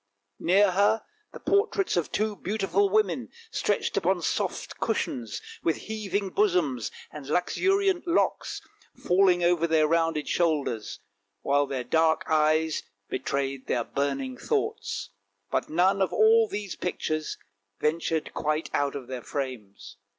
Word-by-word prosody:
Near 190 +3 +4
her 205 +4 +3 0.3
the - - -10
portraits 400 -1 +1
of 175 -3 -1
two 215 0 0
beautiful 195 0 0
women, 215 +3 +1 0.2
stretched - - 0
upon - - +1
soft - - -2
cushions, 120 - -2 0.2
with 165 - +1
heaving 205 -3 -3
bosoms 175 - +1 0.2
and 145 -3 -9
luxuriant 380 - +1
locks 340 - 0 0.3
falling 180 -1 +3
over 170 -1 +3
their 160 -2 +3
rounded 165 -1 +1
shoulders, 150 -10 0 0.4
while 140 0 +2
their 135 -2 -3
dark 160 +5 +2
eyes 155 0 +2 0.3
betrayed 135 0 -2
their 120 - +1
burning 135 -1 -2
thoughts; 100 - -2 0.4
but - - 0
none 185 +5 +3
of 190 - +2
all 445 +1 +5
these 205 - -5
pictures 155 -3 -3 0.4
ventured 160 0 -1
quite 155 +1 -1
out 145 0 0
of 135 -3 -5
their 130 0 -6
frames. 105 -8 -6
165 Hz, 130 wpm, -27 LUFS, 140-200 Hz, 0.4 s, all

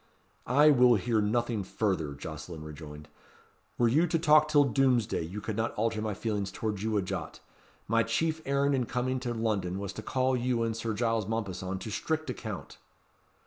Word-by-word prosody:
"I 145 +4 +6
will 125 -3 +6
hear 110 +2 +1
nothing 115 0 0
further," 95 -8 -1
Jocelyn 80 +2 -7
rejoined. 75 -1 -9 0.7
"Were 120 - +4
you 155 +9 +3
to 165 - +1
talk 155 -1 +5
till 150 -1 +5
Doomsday, 125 -5 +2
you 95 +6 -6
could 110 0 -4
not 115 +1 -1
alter 110 0 0
my 110 -2 -2
feelings 105 -2 -2
towards 105 -3 -3
you 110 0 0
a 100 - +1
jot. - - -5 0.5
My 115 +1 +3
chief 160 +8 0
errand 140 0 +1
in 125 -3 0
coming 130 +1 -1
to 125 -1 -3
London 105 -6 -1
was 100 0 -5
to - - -6
call 130 0 +1
you 125 -1 0
and 115 -1 -1
Sir 115 -1 -3
Giles 115 -2 0
Mompesson 95 -4 -3
to 110 - -6
strict 155 +6 -2
account." 110 -7 -7
115 Hz, 185 wpm, -29 LUFS, 100-130 Hz, 0.7 s, I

